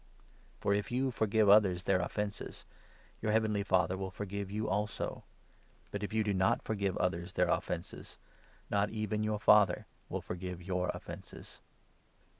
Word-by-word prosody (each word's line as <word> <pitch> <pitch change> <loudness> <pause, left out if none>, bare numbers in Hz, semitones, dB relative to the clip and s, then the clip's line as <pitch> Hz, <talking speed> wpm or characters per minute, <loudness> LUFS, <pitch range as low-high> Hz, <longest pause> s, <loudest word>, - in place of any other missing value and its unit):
For, 100 - +2
if 100 0 -1
you 130 +2 +1
forgive 110 -2 +2
others 100 -3 +6
their 95 -1 +3
offences, 105 +3 -4 0.6
your 110 - +1
heavenly 110 -2 +2
Father 95 -3 +2
14 95 - -4
will 95 - -2
forgive 100 +1 -5
you 105 +2 -2
also; 105 +2 -2 0.7
but, 100 - -3
if 105 - -3
you 110 0 +2
do 105 -1 0
not 95 0 +2
forgive 100 -4 -1
others 90 0 -1
their 90 - +3
15 - - +3
offences, 85 -1 -6 0.5
not 100 0 +2
even 110 -1 -2
your 110 0 0
Father 105 -1 +5 0.2
will - - -2
forgive 90 0 -5
your 90 0 -1
offences. - - -10
100 Hz, 160 wpm, -33 LUFS, 95-105 Hz, 0.7 s, others